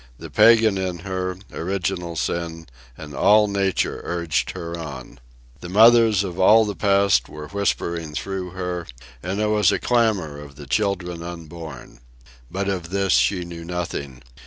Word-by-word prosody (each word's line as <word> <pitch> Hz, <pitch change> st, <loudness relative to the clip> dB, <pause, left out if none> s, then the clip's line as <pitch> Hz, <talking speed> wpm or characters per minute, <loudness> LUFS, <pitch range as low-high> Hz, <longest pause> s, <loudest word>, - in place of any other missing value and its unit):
The -, -, -10 dB
pagan 110 Hz, -4 st, +5 dB
in 90 Hz, -2 st, -2 dB
her, 95 Hz, -1 st, -3 dB, 0.2 s
original 90 Hz, -1 st, -3 dB
sin, 80 Hz, +1 st, -3 dB, 0.3 s
and 75 Hz, -1 st, -9 dB
all 105 Hz, +9 st, +5 dB
nature 100 Hz, -2 st, -1 dB
urged 85 Hz, -3 st, -1 dB
her 85 Hz, 0 st, -5 dB
on. 75 Hz, -7 st, -8 dB, 0.4 s
The 85 Hz, -, -8 dB
mothers 110 Hz, 0 st, +6 dB
of 90 Hz, -2 st, -6 dB
all 110 Hz, +4 st, +6 dB
the 105 Hz, -1 st, -4 dB
past 100 Hz, -, +2 dB
were 75 Hz, -1 st, -9 dB
whispering 85 Hz, -5 st, -2 dB
through 95 Hz, 0 st, -4 dB
her, 90 Hz, -1 st, -4 dB, 0.3 s
and 95 Hz, +3 st, -3 dB
there 105 Hz, 0 st, +1 dB
was 105 Hz, -3 st, +3 dB
a -, -, +1 dB
clamour 105 Hz, -11 st, 0 dB
of 70 Hz, -1 st, -11 dB
the 70 Hz, 0 st, -10 dB
children 90 Hz, +2 st, -1 dB
unborn. 85 Hz, -4 st, -9 dB, 0.5 s
But 100 Hz, +1 st, -3 dB
of 90 Hz, -4 st, -3 dB
this 95 Hz, 0 st, +1 dB
she 90 Hz, -4 st, +2 dB
knew 85 Hz, -1 st, -8 dB
nothing. 85 Hz, -7 st, -5 dB
90 Hz, 155 wpm, -22 LUFS, 85-100 Hz, 0.5 s, mothers